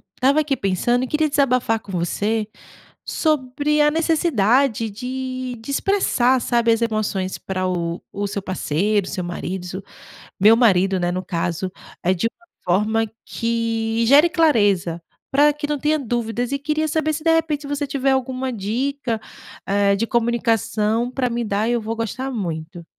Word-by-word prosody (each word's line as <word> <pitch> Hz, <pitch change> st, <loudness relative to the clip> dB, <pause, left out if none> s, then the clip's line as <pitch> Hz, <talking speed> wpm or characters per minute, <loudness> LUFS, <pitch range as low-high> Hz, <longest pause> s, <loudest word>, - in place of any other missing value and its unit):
estava 275 Hz, +4 st, +3 dB
aqui 295 Hz, -2 st, +1 dB
pensando 240 Hz, +5 st, 0 dB
e -, -, -2 dB
queria 305 Hz, +3 st, +1 dB
desabafar 255 Hz, -5 st, +2 dB
com 200 Hz, -, -11 dB
você 205 Hz, +5 st, -1 dB, 0.6 s
sobre 300 Hz, 0 st, 0 dB
a 295 Hz, -, +5 dB
necessidade 275 Hz, -, +2 dB
de 255 Hz, +2 st, -5 dB
de 250 Hz, -, -6 dB
expressar, 270 Hz, -7 st, +2 dB
sabe, 235 Hz, -1 st, +2 dB
as 225 Hz, -, -1 dB
emoções 215 Hz, -4 st, -1 dB
para 185 Hz, -1 st, -3 dB
o 170 Hz, -1 st, -2 dB
o 205 Hz, 0 st, -2 dB
seu 200 Hz, 0 st, -4 dB
parceiro, 190 Hz, +2 st, 0 dB
seu 180 Hz, -, -3 dB
marido 175 Hz, +1 st, -4 dB
s 185 Hz, +2 st, -6 dB, 0.6 s
meu 215 Hz, +4 st, +7 dB
marido, 195 Hz, -5 st, +3 dB
né, 175 Hz, 0 st, 0 dB
no 185 Hz, +1 st, -3 dB
caso, 175 Hz, +2 st, -2 dB, 0.3 s
eh, 185 Hz, +1 st, +3 dB
de 190 Hz, +5 st, 0 dB
uma 350 Hz, +9 st, -15 dB, 0.2 s
forma 210 Hz, +5 st, +2 dB, 0.2 s
que 230 Hz, -1 st, -1 dB
gere 290 Hz, +6 st, +7 dB
clareza, 205 Hz, -, +2 dB, 0.3 s
pra 290 Hz, +2 st, +5 dB
que 295 Hz, 0 st, -4 dB
não 295 Hz, 0 st, -1 dB
tenha 305 Hz, +2 st, +1 dB
dúvidas. 240 Hz, -1 st, -2 dB
E 280 Hz, -, -1 dB
queria 305 Hz, +2 st, -1 dB
saber 310 Hz, 0 st, 0 dB
se, 305 Hz, -, -4 dB
de 330 Hz, -, +4 dB
repente, 320 Hz, -3 st, +1 dB
se -, -, -7 dB
você 290 Hz, 0 st, -2 dB
tiver 275 Hz, 0 st, 0 dB
alguma 260 Hz, 0 st, -1 dB
dica, 235 Hz, +3 st, -2 dB, 0.5 s
eh, 200 Hz, 0 st, +3 dB
de 230 Hz, +3 st, -1 dB
comunicação 230 Hz, -1 st, +1 dB
pra 255 Hz, -1 st, -1 dB
me 235 Hz, 0 st, -2 dB
dar, 210 Hz, +2 st, 0 dB
eu 240 Hz, -1 st, +1 dB
vou 225 Hz, +1 st, -3 dB
gostar 255 Hz, +4 st, -3 dB
muito. 170 Hz, -5 st, -5 dB
230 Hz, 165 wpm, -21 LUFS, 200-275 Hz, 0.6 s, meu